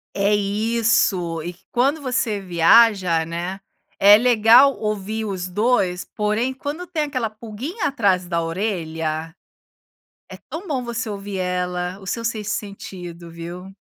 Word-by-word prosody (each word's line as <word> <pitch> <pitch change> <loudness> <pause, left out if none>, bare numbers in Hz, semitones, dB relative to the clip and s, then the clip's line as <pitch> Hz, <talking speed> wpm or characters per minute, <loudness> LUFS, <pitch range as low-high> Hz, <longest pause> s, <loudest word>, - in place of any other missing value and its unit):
É 200 +1 +2
isso, 205 -5 +1
e 175 +1 -6 0.2
quando 275 +6 +1
você 250 -6 -1
viaja, 180 -1 +4
né, 175 +4 -4 0.4
é 205 +1 +8
legal 240 +3 +6
ouvir 215 +1 -3
os 190 -3 -4
2, 185 -2 +1
porém 215 +4 -1
quando 290 +7 -6
tem 310 -2 -1
aquela 255 -6 -2
pulguinha 230 - -6
atrás 200 -10 +1
da 170 -1 0
orelha, 165 -3 -3 0.9
é - - -10
tão 350 +5 -6
bom 265 -6 -2
você 235 0 -4
ouvir 200 -1 -5
ela, 180 0 -2
o 190 - -12
seu 230 +3 -3
sexto 220 -2 -2
sentido, 175 -4 -7
viu? 170 +3 -8
205 Hz, 135 wpm, -22 LUFS, 180-235 Hz, 0.9 s, é